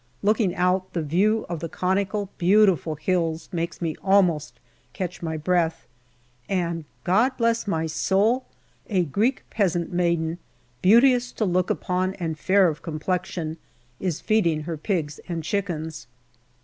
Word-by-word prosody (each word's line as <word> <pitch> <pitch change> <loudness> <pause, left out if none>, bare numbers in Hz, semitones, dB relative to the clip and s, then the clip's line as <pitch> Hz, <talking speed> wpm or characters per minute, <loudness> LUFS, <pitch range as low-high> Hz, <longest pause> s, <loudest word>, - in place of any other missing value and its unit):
Looking 210 -2 +2
out, 180 +1 +1
the 165 - -1
view 200 +9 +2
of 170 -2 -4
the 165 +1 -5
conical 195 +3 -1
beautiful 180 -4 +4
hills 165 0 -1
makes 170 -1 -3
me 160 -2 -1
almost 170 -10 +2 0.3
catch 180 +2 -5
my 160 -2 -3
breath, 165 0 0 0.6
and, 170 -4 -1 0.2
God 230 +9 +2
bless 230 -2 +1
my 165 -5 0
soul! 200 +10 +1 0.4
a 190 -4 +2
Greek 220 - 0
peasant 175 -5 0
maiden, 170 -1 0 0.4
beauteous 245 +5 +5
to 220 - -1
look 180 -1 +1
upon 185 +1 -1
and 165 -3 -3
fair 190 +2 +4
of 155 -2 -3
complexion, 165 0 -3 0.4
is 180 -5 -2
feeding 170 -8 +2
her 165 +2 -4
pigs 155 -3 -2
and 165 -2 -3
chickens. 160 - -3
180 Hz, 135 wpm, -24 LUFS, 165-200 Hz, 0.6 s, beauteous